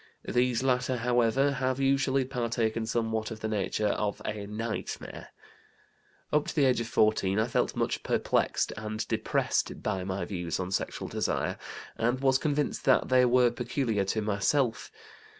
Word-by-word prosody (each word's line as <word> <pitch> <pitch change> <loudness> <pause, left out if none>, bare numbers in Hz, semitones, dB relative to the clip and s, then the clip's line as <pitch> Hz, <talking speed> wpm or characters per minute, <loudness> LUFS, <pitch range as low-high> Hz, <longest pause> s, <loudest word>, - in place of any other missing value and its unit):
These 125 0 +1
latter, 130 -1 +1
however, 120 +3 +2
have 130 -1 -1
usually 135 0 +2
partaken 115 -3 -1
somewhat 110 -1 -1
of 110 -2 -8
the 110 - -1
nature 105 0 0
of 105 0 -1
a 105 -1 -4
nightmare! 110 +1 -5 1.1
"Up 150 0 +2
to - - -4
the 145 -3 +4
age 125 -2 +3
of 115 - -4
14 105 -3 +2
I 110 - +3
felt 120 - 0
much - - -1
perplexed - - 0
and 110 0 -4
depressed - - -1
by 95 -1 -1
my 95 +1 -3
views 85 -5 -3
on 90 0 -3
sexual - - -2
desire, - - -1 0.4
and 120 +3 +1
was 135 -1 +3
convinced 150 -2 -1
that 130 - +4
they 130 0 +5
were 125 0 +4
peculiar 120 -3 -1
to 110 +3 -1
myself. 110 +4 0
115 Hz, 155 wpm, -29 LUFS, 110-130 Hz, 1.1 s, they